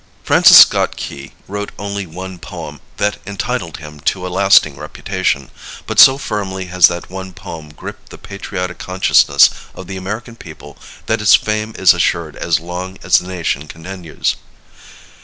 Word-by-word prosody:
Francis -, -, +7 dB
Scott -, -, +6 dB
Key 70 Hz, 0 st, -8 dB
wrote 105 Hz, +1 st, -5 dB
only 100 Hz, -1 st, -5 dB
one 90 Hz, +2 st, -9 dB
poem -, -, -9 dB, 0.2 s
that 105 Hz, 0 st, 0 dB
entitled 100 Hz, -3 st, -4 dB
him 75 Hz, -2 st, -11 dB
to 90 Hz, +5 st, -2 dB
a -, -, -4 dB
lasting 95 Hz, -7 st, +4 dB
reputation, 85 Hz, -2 st, -3 dB, 0.3 s
but -, -, -2 dB
so 135 Hz, 0 st, +8 dB
firmly 95 Hz, -7 st, -4 dB
has 90 Hz, -1 st, +5 dB
that 85 Hz, 0 st, -6 dB
one 95 Hz, 0 st, -7 dB
poem 80 Hz, -3 st, -9 dB
gripped 75 Hz, -, -11 dB
the -, -, -11 dB
patriotic 90 Hz, -2 st, -6 dB
consciousness 95 Hz, 0 st, +4 dB, 0.2 s
of 95 Hz, -, -9 dB
the 95 Hz, +1 st, -7 dB
American 110 Hz, +5 st, -6 dB
people 75 Hz, -8 st, -12 dB, 0.3 s
that -, -, -1 dB
its 95 Hz, -5 st, +6 dB
fame 110 Hz, +4 st, -2 dB
is 95 Hz, -3 st, +6 dB
assured -, -, -1 dB
as -, -, 0 dB
long 90 Hz, +3 st, -7 dB
as -, -, +4 dB
the 90 Hz, -, -10 dB
nation 85 Hz, -5 st, -3 dB
continues. 85 Hz, 0 st, -4 dB
95 Hz, 160 wpm, -16 LUFS, 85-100 Hz, 0.3 s, so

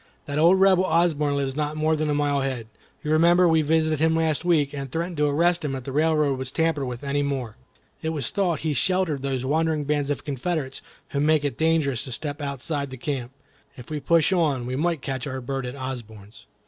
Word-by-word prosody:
That 145 Hz, +1 st, -2 dB
old 175 Hz, +4 st, +5 dB
Rebel 190 Hz, -1 st, +5 dB
Osborne 160 Hz, -4 st, +2 dB
lives 135 Hz, -1 st, -2 dB
not 150 Hz, 0 st, -2 dB
more 155 Hz, +1 st, +2 dB
than 155 Hz, 0 st, -1 dB
a 145 Hz, -, +1 dB
mile 145 Hz, -1 st, +1 dB
ahead. 130 Hz, -4 st, -3 dB, 0.4 s
You 150 Hz, -, -2 dB
remember 170 Hz, +3 st, +5 dB
we 160 Hz, -1 st, +4 dB
visited 155 Hz, 0 st, +1 dB
him 160 Hz, +1 st, +3 dB
last 160 Hz, -1 st, 0 dB
week, 155 Hz, -5 st, +2 dB
and 135 Hz, -2 st, -5 dB
threatened 170 Hz, +1 st, -3 dB
to 150 Hz, 0 st, +2 dB
arrest 170 Hz, +4 st, +2 dB
him 140 Hz, -3 st, -2 dB
if 130 Hz, -, -6 dB
the 135 Hz, -, -6 dB
railroad 150 Hz, -2 st, +2 dB
was 130 Hz, 0 st, -3 dB
tampered 160 Hz, -3 st, 0 dB
with 125 Hz, +1 st, -6 dB
any 140 Hz, +1 st, 0 dB
more. 135 Hz, -6 st, -3 dB, 0.5 s
It 160 Hz, -, -2 dB
was 155 Hz, -3 st, -2 dB
thought 180 Hz, -6 st, 0 dB
he 155 Hz, -2 st, 0 dB
sheltered 170 Hz, 0 st, +1 dB
these 130 Hz, -2 st, -2 dB
wandering 155 Hz, +1 st, +1 dB
bands 145 Hz, 0 st, -1 dB
of 145 Hz, -, -3 dB
Confederates 140 Hz, 0 st, -3 dB, 0.3 s
who 140 Hz, -, -2 dB
make 150 Hz, 0 st, +3 dB
it 140 Hz, -4 st, -1 dB
dangerous 160 Hz, -5 st, +1 dB
to 130 Hz, -, -8 dB
step 145 Hz, +4 st, -4 dB
outside 140 Hz, +1 st, -2 dB
the 130 Hz, -, -8 dB
camp. 130 Hz, -2 st, -4 dB, 0.5 s
If 125 Hz, +3 st, -11 dB
we 150 Hz, -, -2 dB
push 165 Hz, +5 st, +3 dB
on, 150 Hz, -9 st, +1 dB
we 125 Hz, +1 st, -3 dB
may 165 Hz, +4 st, 0 dB
catch 135 Hz, -1 st, -4 dB
our 130 Hz, -1 st, -4 dB
bird 135 Hz, 0 st, -4 dB
at 125 Hz, -, -6 dB
Osborne's." 115 Hz, -6 st, -8 dB
145 Hz, 220 wpm, -24 LUFS, 135-160 Hz, 0.5 s, old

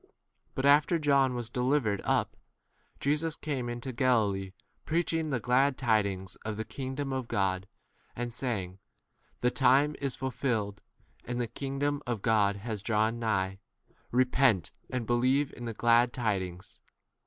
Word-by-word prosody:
14 -, -, -32 dB, 0.4 s
But 135 Hz, -, -1 dB
after 145 Hz, +4 st, +5 dB
John 140 Hz, -4 st, +3 dB
was 120 Hz, -2 st, -5 dB
delivered 125 Hz, -5 st, +1 dB
up, -, -, +1 dB, 0.6 s
Jesus 150 Hz, +3 st, 0 dB
came 135 Hz, -5 st, -3 dB
into 120 Hz, +2 st, -4 dB
Galilee 105 Hz, -7 st, +1 dB, 0.3 s
preach 165 Hz, +1 st, 0 dB
ing 160 Hz, -1 st, 0 dB
the 135 Hz, -4 st, 0 dB
glad 130 Hz, +4 st, +2 dB
tidings 100 Hz, -6 st, 0 dB
of 110 Hz, -1 st, -5 dB
the 110 Hz, -, -2 dB
king 130 Hz, +3 st, -5 dB
15 -, -, -7 dB
dom 140 Hz, -1 st, -2 dB
of 130 Hz, -2 st, -3 dB
God, 95 Hz, -3 st, 0 dB, 0.5 s
and 120 Hz, 0 st, -4 dB
saying, 100 Hz, -8 st, -3 dB, 0.6 s
The 125 Hz, -, +3 dB
time 140 Hz, +3 st, +4 dB
is 140 Hz, -2 st, -1 dB
fulfilled 115 Hz, -6 st, -2 dB, 0.4 s
and 125 Hz, 0 st, -3 dB
the 120 Hz, -, +1 dB
kingdom 140 Hz, +4 st, -2 dB
of 115 Hz, -5 st, -2 dB
God 105 Hz, -3 st, +3 dB
has 105 Hz, 0 st, -5 dB
drawn 110 Hz, +2 st, +1 dB
nigh; 95 Hz, -4 st, -1 dB, 0.5 s
repent 125 Hz, -5 st, +3 dB, 0.2 s
and 130 Hz, -2 st, -2 dB
16 -, -, -9 dB
believe 130 Hz, +5 st, +2 dB
in 120 Hz, -, -8 dB
the 115 Hz, -, -3 dB
glad 120 Hz, +1 st, +4 dB
tidings. 95 Hz, -7 st, -3 dB
120 Hz, 155 wpm, -30 LUFS, 105-135 Hz, 0.6 s, after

